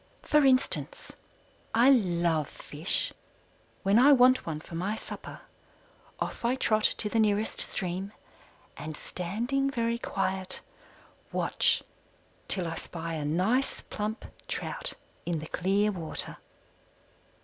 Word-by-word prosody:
For 300 -1 +4
instance: 260 -1 +2 0.6
I 245 +4 +7
love 170 - +2
Fish. 155 +5 -2 0.7
When 200 +4 +5
I 285 +3 +8
want 255 -3 +5
one 155 -2 -2
for 165 - -13
my 185 +6 -1
supper - - -7 0.8
off - - -4
I 240 +2 +2
trot 215 -4 +2
to 210 - +2
the 225 +2 +1
nearest 215 0 +2
stream, 185 +1 -2 0.6
and 150 +1 -6
standing 240 +10 -1
very 235 -2 0
quiet, 190 -3 -1 0.7
watch - - +2 0.6
till 180 -3 +1
I 165 0 -4
spy 165 -1 -5
a 155 -2 -2
nice, 190 - +1
plump 215 +2 -3 0.2
trout - - -4 0.3
in 175 -1 0
the 155 - -5
clear 195 +5 +1
water. 170 -5 -5
200 Hz, 120 wpm, -29 LUFS, 170-235 Hz, 0.8 s, I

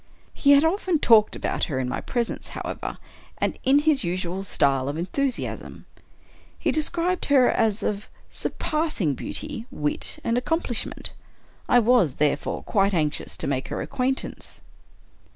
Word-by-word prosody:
He 285 -1 +5
had 280 +1 +6
often 365 0 +1
talked 225 -6 +5
about - - -1
her 145 -7 -3
in 130 -1 -1
my - - -3
presence, 235 -2 -2
however, - - -5 0.4
and - - -1
in 270 +2 +5
his 295 -3 +3
usual 180 +1 -2
style 135 -7 +1
of 145 - -3
enthusiasm. 250 - -3 0.7
He - - 0
described 345 +3 0
her 270 -3 +5
as 220 -1 +1
of 205 0 -2 0.2
surpassing 305 - -1
beauty, 265 - -4
wit, 150 0 0
and 230 +1 +1
accomplishment. 295 -4 -2 0.6
I - - +6
was, 230 - +4
therefore, 150 -1 0
quite 195 -1 +1
anxious 150 -3 -1
to - - -3
make 135 -2 -1
her - - -4
acquaintance. 260 +1 -3
230 Hz, 140 wpm, -25 LUFS, 170-285 Hz, 0.7 s, had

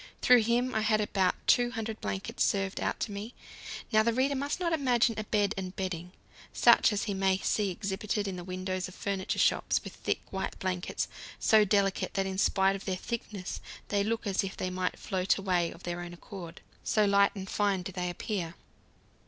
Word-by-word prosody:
Through 250 -1 +7
him 240 +3 +1
I 220 - +1
had 215 0 +3
about 195 -3 +1
200 230 -3 +1
blankets 195 - -2
served 195 -1 0
out - - -1
to 215 - -1
me. 205 +4 -6 0.6
Now, 215 -1 +5
the 235 +2 +2
reader 265 +3 +2
must 285 +5 -2
not 340 -2 0
imagine 250 -6 +3
a 215 - -3
bed 205 -1 +1
and 185 -1 -5
bedding, 180 -2 -4 0.4
such - - +6
as 205 -1 -1
he 205 - -2
may 190 -1 +2
see 200 +1 0
exhibited 200 +2 -2
in 190 - -3
the 180 - -6
windows 185 +1 -3
of 185 - -12
furniture 195 -2 -2
shops, - - +2
with - - -8
thick, - - -2
white 190 0 -3
blankets, 185 -1 -2 0.3
so 215 -2 +5
delicate 195 +1 +1
that 195 -1 +1
in 190 0 -3
spite 195 0 +3
of 195 - -8
their 190 - 0
thickness 205 -2 -5 0.3
they 200 -1 +2
look 230 +2 -1
as 195 -1 +1
if 195 - -5
they 185 - -2
might 180 0 -2
float 185 -2 0
away 180 -4 +1
of 170 - -12
their 175 0 -3
own 175 0 -7
accord, 175 -2 -9 0.2
so 215 -1 +3
light 200 0 +4
and 190 -1 -6
fine 200 -2 +1
do 190 - -5
they 180 -1 -2
appear. 175 -1 -3
195 Hz, 200 wpm, -30 LUFS, 185-215 Hz, 0.6 s, Through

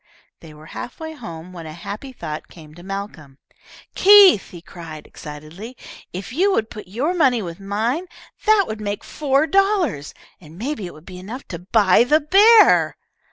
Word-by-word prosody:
They 160 - -13
were 150 +1 -15
half 240 - -8
way 320 0 -7
home 180 - -10
when 165 -3 -9
a 155 - -8
happy 205 - -8
thought 155 -11 -7
came 155 -3 -15
to 175 - -14
Malcolm. 190 -8 -8 0.6
"Keith," 395 - +7
he 175 - -11
cried, 165 -3 -11
excitedly, 160 +11 -10 0.3
"if 190 +6 -7
you 380 +8 +2
would 220 -10 -1
put 210 -5 -9
your 255 - -2
money 260 - +2
with 170 0 -8
mine, 225 - -2 0.4
that 430 -2 +5
would 215 0 -6
make 205 -1 -4
four 280 0 0
dollars, 380 - 0 0.2
and 160 -1 -15
maybe 230 -3 -4
it - - -11
would 155 +2 -16
be 180 -1 -10
enough 225 +9 -9
to 170 - -6
buy 195 +2 +3
that 300 +3 +1
bear!" 430 +3 +6
205 Hz, 175 wpm, -20 LUFS, -, 0.6 s, Keith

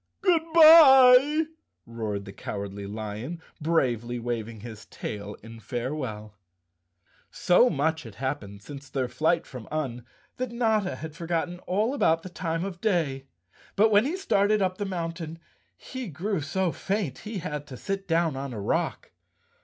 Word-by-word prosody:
"Good 350 -4 +4
bye!" 300 -3 +8 0.4
roared 110 -4 -4
the 95 - -9
Cowardly 100 0 -6
Lion, 110 +9 -5 0.2
bravely 120 -7 0
waving 115 -2 -4
his 110 -2 -10
tail 105 -1 -6
in 115 0 -11
farewell. 120 -2 -5 1.0
So 210 +8 +4
much 160 - 0
had 115 -7 -11
happened 105 -6 -5
since 140 +1 -10
their 130 -2 -1
flight 155 +8 +1
from 125 -4 -10
Un 130 -6 -3 0.3
that 255 -1 -3
Notta 220 -5 +1
had 160 -1 -8
forgotten 175 +1 -2
all 210 +7 +1
about 165 - +2
the 185 - -7
time 165 -1 -3
of 185 -3 -7
day, 155 -11 0 0.5
but 215 +2 +4
when 210 +3 +5
he 325 +7 -2
started 210 - +2
up 185 -1 -1
the 205 - -1
mountain, 165 -3 -4 0.4
he 260 -2 -7
grew 185 +3 -2
so 175 +5 -1
faint, 190 - -3
he 215 0 -6
had 150 -5 -5
to 130 -3 -9
sit 195 +4 -4
down 165 -3 +1
on 135 -1 -5
a 110 - -5
rock. 100 - -2
160 Hz, 155 wpm, -26 LUFS, 120-195 Hz, 1.0 s, bye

